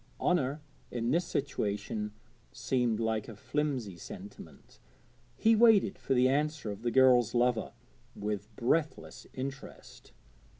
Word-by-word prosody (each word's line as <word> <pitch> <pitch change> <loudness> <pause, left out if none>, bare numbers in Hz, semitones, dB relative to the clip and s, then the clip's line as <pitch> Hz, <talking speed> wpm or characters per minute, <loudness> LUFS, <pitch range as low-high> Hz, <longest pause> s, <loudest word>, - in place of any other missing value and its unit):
Honour 150 -4 +1 0.3
in 120 0 -2
this 170 +4 +2
situation 105 -5 -2 0.4
seemed 120 -4 0
like 110 -2 -1
a 115 - -9
flimsy 130 - -2
sentiment. - - -11 0.6
He 225 +1 +4
waited 215 -4 +5
for 135 - 0
the 125 +1 +5
answer 145 -3 0
of 100 - -8
the 120 - 0
girl's 125 -2 +4
lover 120 -2 +1 0.4
with 105 0 -3
breathless 150 +7 -1
interest. 135 +1 -8
125 Hz, 120 wpm, -31 LUFS, 110-150 Hz, 0.6 s, waited